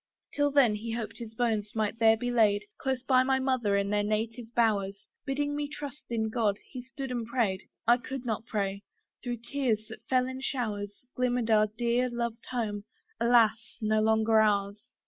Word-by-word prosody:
Till 290 0 +2
then 275 -6 +4
he 225 +2 -4
hoped 230 -1 -5
his 225 -2 -8
bones 220 -3 -1
might 220 +1 -1
there 225 -1 +6
be 245 +2 -2
laid, 210 -3 +3 0.2
Close 265 -2 -1
by 255 -1 +4
my 265 +1 +2
mother 255 -6 +1
in 200 0 0
their 210 0 +2
native 220 +3 -2
bowers: 200 -4 +1 0.2
Bidding 290 +1 -1
me 295 0 -2
trust 295 -1 -8
in 220 -2 0
God, 215 -4 +1
he 255 - -6
stood 265 +1 -7
and 235 -3 -3
prayed, 225 -6 0 0.2
I 240 +1 +6
could 260 0 -6
not 225 -1 -3
pray: 200 -2 -2 0.4
through 240 -2 -4
tears 240 -6 0
that - - -10
fell 255 -1 +3
in 260 0 -6
showers, 210 -5 -3
Glimmer'd 245 -2 0
our 215 -1 +5
dear 240 +3 0
loved 235 -1 -4
home, 210 -5 -3 0.3
alas! 230 -1 +3
no 215 0 +2
longer 220 0 +4
ours! 205 -1 +1
230 Hz, 185 wpm, -29 LUFS, 215-250 Hz, 0.4 s, there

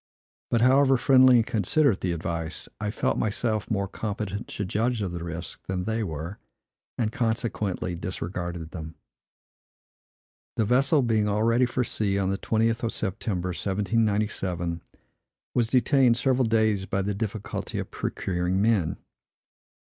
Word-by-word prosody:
But, 115 - +2
however 135 +2 +5
friendly 130 0 +6
and 115 -2 +4
considerate 115 - +2
the 90 - 0
advice, 80 -1 -4
I 105 -1 -2
felt 105 - 0
myself 110 0 -1
more 100 -3 0
competent 105 0 -4
to 105 - -4
judge 110 +3 0
of 95 - -3
the 85 -1 -5
risk 85 0 -6
than 95 -1 -2
they 110 +3 -1
were, 85 +2 -5 0.6
and, 110 -3 0
consequently, 110 -6 -1
disregarded 85 -1 -5
them. 80 -2 -7 1.6
The 110 - +1
vessel, 135 +5 +3
being 110 -3 +2
all 105 +1 +1
ready 115 +2 +3
for 125 +1 0
sea 100 -4 -1
on 95 -1 +1
the 95 - -2
20th 115 +1 +1
of 115 - -1
September, 95 -2 -2
1797, 100 -3 -1 0.7
was 120 -2 +1
detained 125 0 +4
several 130 -1 +2
days 110 -3 +2
by 95 +1 0
the 100 +1 -1
difficulty 105 0 -4
of - - -4
procuring 90 +1 -1
men. 105 -6 +2
105 Hz, 140 wpm, -26 LUFS, 90-115 Hz, 1.6 s, friendly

